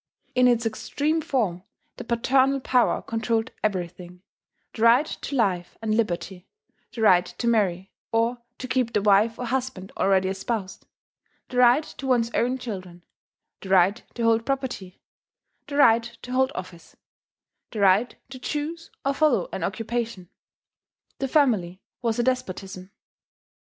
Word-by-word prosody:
In 250 0 +4
its 240 -1 +2
extreme 295 +8 -1
form, 235 - -1 0.4
the - - -6
paternal 260 +4 +2
power 250 -2 +2
controlled 225 +1 -1
everything, 180 -2 -4 0.5
the 220 - -7
right 235 +5 +6
to 285 - -6
life 185 -8 0
and 220 -1 -1
liberty, 180 -4 -2 0.4
the 225 - -4
right 180 -4 +6
to 180 +7 -5
marry, 195 -5 +1 0.2
or 230 +2 +1 0.2
to 255 - -6
keep 250 -2 0
the 210 - +2
wife 210 +3 +4
or 250 - -4
husband 245 -6 -3
already 190 -1 +2
espoused, 195 0 -4 0.6
the 250 - -5
right 250 +5 +6
to 270 - -8
one's 240 -3 +2
own 250 +2 +1
children, 185 -8 -7 0.6
the 190 - -9
right 190 +3 +4
to 235 - -3
hold 230 0 +3
property, 255 -9 -4 0.6
the 285 - -6
right 235 -3 +4
to 250 - -8
hold 260 +1 +2
office, 180 -2 -9 0.7
the 220 - -6
right 200 +4 +3 0.2
to 260 - -8
choose 310 +5 -4 0.2
or 275 - +2
follow 310 - +2
an - - -3
occupation. 225 -5 -3 0.9
The 270 - -1
family 220 - +2 0.2
was 230 -2 0
a 240 - +1
despotism. 195 -7 -3
230 Hz, 145 wpm, -25 LUFS, 190-255 Hz, 0.9 s, right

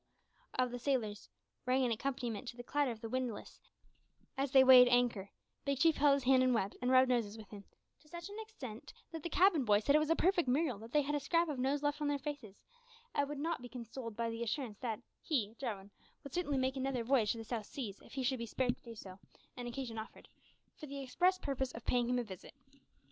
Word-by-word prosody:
of 255 -1 +2
the 245 - -5
sailors 230 - -1 0.4
rang 255 +1 +3
an 240 - 0
accompaniment 245 -1 -3
to 240 - -7
the 245 - -7
clatter 285 +2 +1
of 225 -2 -6
the 225 - -4
windlass 255 -3 -4 0.8
as 275 +1 -1
they 265 -2 +8
weighed 255 -1 +9
anchor, 245 -5 +2 0.3
Big 280 -1 0
Chief 325 +3 +4
held 285 -1 +5
his 280 - -3
hand 260 0 +5
and 255 -1 +3
wept, 200 -3 -1
and 250 - 0
rubbed 260 0 +6
noses 230 -4 0
with 215 -2 -11
him 205 -2 -9 0.4
to 305 - -24
such 345 +1 -7
an 410 +2 -8
extent 280 - -9 0.2
that 325 -1 -6
the 340 - -4
cabin 350 -3 +4
boy 210 -3 +4
said 280 +7 +3
it - - +7
was 305 0 0
a 330 - +4
perfect 355 -3 +2
miracle 260 -3 +1
that 225 +2 -11
they 295 +1 +3
had 290 +2 -2
a 290 - +1
scrap 335 +4 +1
of 285 -4 -3
nose 275 +3 0
left 290 +1 0
on 295 - +1
their 290 0 +1
faces 275 -8 -6 0.6
and 285 0 0
would 295 - -4
not 320 0 -2
be 245 - -9
consoled 235 -2 -7
by 230 +1 -1
the 230 0 -4
assurance 235 -2 -3
that 225 -4 -4 0.2
he, 225 -9 -1
Jarwin, 205 -7 -5 0.3
would 280 -2 -10
certainly 295 -6 0
make 260 +1 0
another 265 -2 -1
voyage 230 -4 +3
to - - -8
the 225 - -6
South 220 -2 -4
Seas, 215 -8 -6
if - - -16
he 265 - -2
should 255 0 0
be 235 - -4
spared 250 +2 0
to - - -31
do 230 -1 -10
so, 190 -3 -10 0.4
and 245 -1 -6
occasion 240 -2 -5
offered, 220 - -10 0.5
for 305 - -8
the 280 0 -6
express 355 +8 +2
purpose 265 -5 -2
of 225 - -9
paying 245 -1 +1
him 250 - +2
a 245 - 0
visit. 195 +2 -11
255 Hz, 240 wpm, -35 LUFS, 230-285 Hz, 0.8 s, weighed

